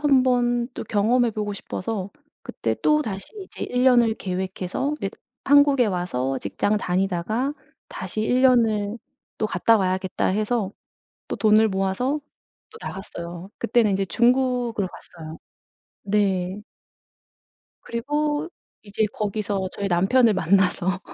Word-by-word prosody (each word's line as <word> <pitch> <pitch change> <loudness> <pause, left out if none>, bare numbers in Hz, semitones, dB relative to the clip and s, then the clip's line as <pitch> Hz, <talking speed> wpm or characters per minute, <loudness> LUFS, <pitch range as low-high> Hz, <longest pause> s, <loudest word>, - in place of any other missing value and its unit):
한번 250 -4 +3
또 - - -5
경험해 235 +3 +2
보고 210 -1 -3
싶어서 200 0 -4 0.3
그때 - - -2
또다시 225 -11 +1 0.2
이제 - - -7
1 250 +1 0
년을 240 -3 +5
계획해서 190 +8 -3
이제 195 - -3 0.3
한국에 285 -3 +5
와서 135 -9 -1
직장을 125 - -1
다니다가 195 +8 -1 0.4
'다시 215 - -5
1 250 +3 +2
년을 225 -4 +3 0.4
또 215 - +1
갔다 215 +4 +3
와야겠다.' 190 -1 -1
해서 210 +1 0 0.6
또 - - -3
돈을 215 0 +4
모아서 195 +9 0 0.5
또 450 - -12
나갔어요. 175 -1 -7
그때는 225 -1 +2
이제 195 0 0
중국으로 240 0 +1
갔어요. 160 -3 -11 0.7
네. 195 -1 0 1.2
그리고 295 +6 -1 0.3
이제 210 +1 -1
거기서 205 -2 -2
저희 200 -1 -3
남편을 205 +6 +4
만나서 185 0 +2
210 Hz, 260 characters per minute, -23 LUFS, 190-245 Hz, 1.2 s, 년을